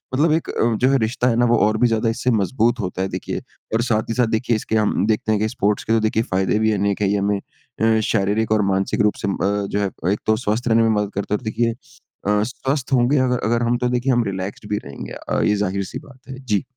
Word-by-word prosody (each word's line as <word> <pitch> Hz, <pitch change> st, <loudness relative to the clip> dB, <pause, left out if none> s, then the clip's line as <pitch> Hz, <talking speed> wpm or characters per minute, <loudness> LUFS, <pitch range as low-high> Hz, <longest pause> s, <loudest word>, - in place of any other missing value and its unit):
मतलब 155 Hz, +4 st, +3 dB
एक 160 Hz, +1 st, 0 dB
अ, 115 Hz, 0 st, +1 dB
जो 125 Hz, +4 st, +2 dB
है 135 Hz, -, +4 dB
रिश्ता 120 Hz, +2 st, 0 dB
है 115 Hz, -, +2 dB
ना 120 Hz, -, +3 dB
वो 120 Hz, 0 st, +3 dB
और 110 Hz, -, 0 dB
भी 125 Hz, -, +4 dB
ज़्यादा 115 Hz, 0 st, +1 dB
इससे 125 Hz, +2 st, 0 dB
मज़बूत 115 Hz, +3 st, +1 dB
होता 95 Hz, -1 st, -3 dB
है 95 Hz, -, 0 dB
देखिए। -, -, -4 dB, 0.3 s
और 115 Hz, -, +2 dB
साथ 110 Hz, -2 st, 0 dB
ही -, -, 0 dB
साथ 125 Hz, -2 st, +2 dB
देखिए 120 Hz, -1 st, 0 dB
इसके 110 Hz, +1 st, -2 dB
हम 105 Hz, -2 st, +1 dB
देखते 110 Hz, 0 st, 0 dB
हैं 105 Hz, -1 st, +1 dB
कि 110 Hz, -, +1 dB
स्पोर्ट्स 105 Hz, 0 st, 0 dB
के 115 Hz, -, 0 dB
तो 115 Hz, -, +4 dB
देखिए 110 Hz, +1 st, +1 dB
फ़ायदे 95 Hz, +2 st, 0 dB
भी 110 Hz, 0 st, +2 dB
अनेक 100 Hz, 0 st, 0 dB
है। 100 Hz, -, +2 dB
ये 105 Hz, -, +1 dB
हमें 100 Hz, 0 st, 0 dB, 0.4 s
अ, 110 Hz, 0 st, +4 dB
शारीरिक 105 Hz, +1 st, 0 dB
और 110 Hz, -1 st, +3 dB
मानसिक 95 Hz, +1 st, 0 dB
रूप 105 Hz, 0 st, +3 dB
से -, -, -1 dB
म 100 Hz, -, 0 dB
अ, 100 Hz, +1 st, 0 dB
जो 100 Hz, -, -2 dB
है 100 Hz, -, +1 dB, 0.2 s
एक 105 Hz, -, -1 dB
तो 110 Hz, -, +3 dB
स्वस्थ 120 Hz, +1 st, -2 dB
रहने 115 Hz, 0 st, +4 dB
में 115 Hz, -, +3 dB
मदद 105 Hz, -2 st, 0 dB
करता 100 Hz, +1 st, -3 dB
है 105 Hz, -, +3 dB
और -, -, -15 dB
देखिए 115 Hz, +2 st, 0 dB
अ, 105 Hz, -2 st, -4 dB
स्वस्थ 135 Hz, +3 st, -3 dB
होंगे 125 Hz, +3 st, +3 dB
अगर 125 Hz, -1 st, +1 dB
अगर 115 Hz, +2 st, +1 dB
हम 120 Hz, +1 st, +1 dB
तो 125 Hz, 0 st, 0 dB
देखिए 125 Hz, +2 st, +1 dB
हम 120 Hz, -1 st, +2 dB
रिलैक्सड 100 Hz, +1 st, -5 dB
भी 105 Hz, -, 0 dB
रहेंगे। 70 Hz, -, -8 dB
अ, -, -, -2 dB
ये 105 Hz, -, +3 dB
ज़ाहिर-सी 100 Hz, +4 st, -2 dB
बात 140 Hz, -4 st, -16 dB
है। 130 Hz, -, -7 dB
जी। 105 Hz, -7 st, -1 dB
110 Hz, 270 wpm, -21 LUFS, 105-120 Hz, 0.4 s, है